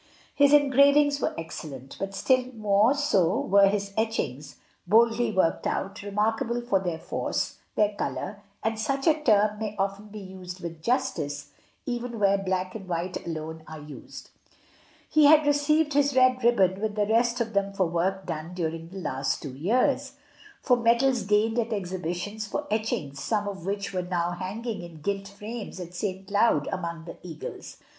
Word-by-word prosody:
His 285 -1 +5
engravings 285 0 +5
were - - -1
excellent, 145 -5 -7
but 195 0 -4
still 255 +5 +2
more 215 +4 +3
so 200 - +2
were 200 +1 +5
his 200 0 -1
etchings, 150 - -2 0.3
boldly 230 +3 +4
ALMSGIVING. - - -3
8 - - -8
1 190 - +5
worked 165 - -2
out, 195 +1 -3
remarkable 220 +4 0
for 240 -5 +1
their 175 -3 -3
force, - - -3 0.2
their 210 -1 +2
colour 200 0 -4 0.2
(and 220 0 -1
such 270 +5 -1
a 320 - +6
term 210 -5 +3
may 215 -1 -3
often 200 +2 -2
be 210 +1 -10
used 185 -2 -8
with 165 -2 -7
justice 150 - -1 0.3
even 240 -1 -3
where 200 -1 +3
black 185 -1 -2
and 195 -4 -8
white 175 +1 -3
alone 160 0 -5
are 155 0 -8
used)* 150 0 -11 0.8
He 310 -1 +4
had 305 +1 +7
received 295 +1 +2
his 285 -1 +2
red 255 -1 +4
ribbon 195 -5 +3
with 215 -1 -1
the 210 -1 +2
rest 235 +3 +2
of 230 -1 -2
them 200 0 +1
for 195 -1 +1
work 185 +3 -1
done 160 +3 -5
during 165 -1 -3
the 190 - -9
last 135 -7 -2
two 140 -4 -6
years, 200 - +1 0.5
for 250 -2 +4
medals 240 +2 +3
gained 215 +3 +2
at 230 0 -1
exhibitions 185 +1 -3
for 295 - -3
etchings, 155 -11 -2
some 210 -2 0
of 190 -3 -6
which 200 0 -2
were 185 - 0
now 175 -1 -1
hanging 205 +6 -4
in 170 -3 -11
gilt 195 +3 -2
frames 210 +1 -7
at 175 -1 -7
St. 190 +1 -4
Cloud 200 -7 +2
among 170 -2 -4
the - - -9
eagles. 165 -4 -8
200 Hz, 175 wpm, -27 LUFS, 180-235 Hz, 0.8 s, had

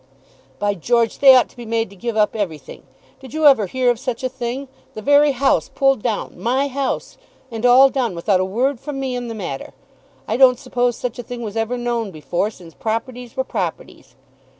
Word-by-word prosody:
"By 205 0 0
George, 230 +5 0
they 270 -2 +8
ought 250 - +4
to - - -22
be 240 - -9
made 225 -2 -2
to - - -13
give 230 +3 -4
up 210 0 +2
everything. 160 -10 -5 0.4
Did 265 +2 -11
you 315 -1 +1
ever 265 -9 +6
hear 255 +3 +2
of 235 - -4
such 255 -1 -4
a 255 - 0
thing; 250 +3 -5 0.3
the 215 - -6
very 290 +2 +5
house 270 +1 +1
pulled 270 -4 +2
down; 220 -3 -3
my 265 +4 0
house; 275 0 -3 0.3
and 230 +1 0
all 255 +2 +8
done 245 -9 -1
without 185 +3 +1
a - - +2
word 240 +7 -1
from 290 0 -6
me 265 -2 -2
in 245 -1 -4
the 230 - -5
matter? 175 -10 -6 0.5
I - - -1
don't 255 -1 +6
suppose 245 -1 -1
such 245 0 -5
a - - -4
thing 240 +1 -7
was 215 -1 -6
ever 225 +2 -1
known 240 -3 -2
before, 175 +4 -2
since 175 -6 -14
properties 235 +2 -4
were 260 - +1
properties." - - -5
240 Hz, 210 wpm, -20 LUFS, 215-260 Hz, 0.5 s, they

